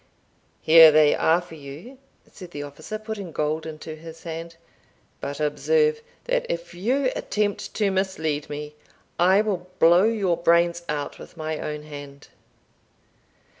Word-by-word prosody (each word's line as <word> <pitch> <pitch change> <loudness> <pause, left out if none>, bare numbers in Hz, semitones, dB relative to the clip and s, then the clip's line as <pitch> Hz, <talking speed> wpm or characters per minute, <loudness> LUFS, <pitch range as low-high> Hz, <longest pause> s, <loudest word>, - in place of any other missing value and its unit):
"Here 160 0 +9
they 150 -1 +5
are 165 +2 +3
for 175 -2 -14
you," 160 - -11 0.3
said 180 -3 -11
the 145 -3 -6
officer, 155 +9 -7
putting 215 -4 -6
gold 155 +1 -2
into 155 0 -7
his 165 +1 -12
hand; 165 0 -6 0.6
"but 140 +1 -5
observe, 455 - +1 0.2
that - - 0
if 170 0 -4
you 255 +9 0
attempt 205 -1 -2
to 205 -2 +1
mislead 160 -6 -2
me, 150 0 -6 0.5
I 190 +4 +5
will 185 -4 -3
blow 175 +4 +6
your 200 -6 +1
brains 170 0 +3
out 145 -1 -3
with - - -13
my 155 -1 -3
own 150 0 -5
hand." 145 -2 -11
170 Hz, 140 wpm, -24 LUFS, 155-195 Hz, 0.6 s, Here